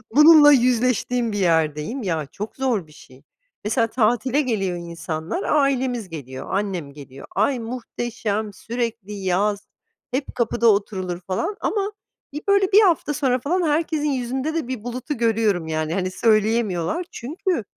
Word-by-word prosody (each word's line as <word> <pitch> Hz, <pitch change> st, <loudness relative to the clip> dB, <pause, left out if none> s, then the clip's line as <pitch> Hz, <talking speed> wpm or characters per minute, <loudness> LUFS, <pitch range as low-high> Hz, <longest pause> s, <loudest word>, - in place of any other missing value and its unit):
bununla 300 Hz, -1 st, +9 dB
yüzleştiğim 250 Hz, -2 st, +2 dB
bir 205 Hz, -, -3 dB
yerdeyim. 160 Hz, -, +1 dB
Ya, 160 Hz, -5 st, -1 dB
çok 210 Hz, +2 st, -6 dB
zor 240 Hz, -11 st, -1 dB
bir -, -, -19 dB
şey. 130 Hz, -3 st, -17 dB, 0.4 s
Mesela, 230 Hz, +2 st, +1 dB
tatile 245 Hz, +4 st, +1 dB
geliyor 195 Hz, -9 st, -1 dB
insanlar, 170 Hz, -, -4 dB
ailemiz 260 Hz, -7 st, +1 dB
geliyor, 130 Hz, -5 st, -8 dB
annem 185 Hz, -8 st, -2 dB
geliyor, 140 Hz, -2 st, -11 dB
"Ay, 265 Hz, -3 st, +2 dB
muhteşem 225 Hz, -3 st, -4 dB
sürekli 230 Hz, -2 st, -4 dB
yaz 200 Hz, +2 st, -1 dB, 0.4 s
hep 265 Hz, +2 st, -3 dB
kapıda 235 Hz, 0 st, +1 dB
oturulur," 190 Hz, -4 st, +1 dB
falan 190 Hz, -, -2 dB
ama 405 Hz, -1 st, -1 dB, 0.4 s
bir 295 Hz, -, -4 dB
böyle 400 Hz, 0 st, +3 dB
1 415 Hz, +2 st, +7 dB
hafta 335 Hz, -6 st, +2 dB
sonra 260 Hz, -3 st, +1 dB
falan 340 Hz, +9 st, 0 dB
herkesin 300 Hz, -1 st, 0 dB
yüzünde 265 Hz, +3 st, -2 dB
de 320 Hz, -7 st, -2 dB
bir 255 Hz, -5 st, -5 dB
bulutu 250 Hz, +3 st, -4 dB
görüyorum 220 Hz, -7 st, +1 dB
yani, 155 Hz, 0 st, -2 dB
hani, 185 Hz, 0 st, -1 dB
söyleyemiyorlar 215 Hz, -, +1 dB
çünkü 315 Hz, -, -2 dB
230 Hz, 140 wpm, -22 LUFS, 185-265 Hz, 0.4 s, bununla